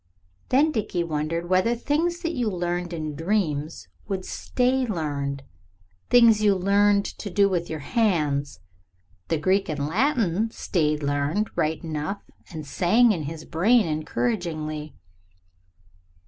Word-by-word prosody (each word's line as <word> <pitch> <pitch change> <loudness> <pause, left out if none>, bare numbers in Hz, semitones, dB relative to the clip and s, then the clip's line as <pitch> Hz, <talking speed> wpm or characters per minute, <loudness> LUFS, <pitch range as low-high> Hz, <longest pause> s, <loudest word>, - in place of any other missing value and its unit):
Then 290 +5 +4
Dickie 200 - -1
wondered 165 +1 -2
whether 185 +6 +2
things 325 +8 -1
that 335 0 -1
you 245 -7 0
learned 175 -1 -2
in 155 -3 -4
dreams 160 -3 -2 0.2
would 190 -2 -3
"stay 255 +1 0
learned." 140 -7 -3 0.7
Things 230 -3 +6
you 205 -2 +4
learned 200 +2 +3
to 205 - -6
do 200 +2 +3
with 175 -3 -2
your 155 -2 -4
hands. 150 - 0 0.7
The 165 - 0
Greek 190 +5 +1
and 155 - -2
the 140 - -2
Latin 220 - +1
"stayed 150 -8 -1
learned" 145 +9 0
right 155 +3 -1
enough 160 +5 -4 0.3
and 155 -3 -7
sang 220 - +3
in 165 -7 -2
his 155 +2 -7
brain 210 +8 +3
encouragingly. 155 -2 -3
175 Hz, 135 wpm, -25 LUFS, 155-215 Hz, 0.7 s, Things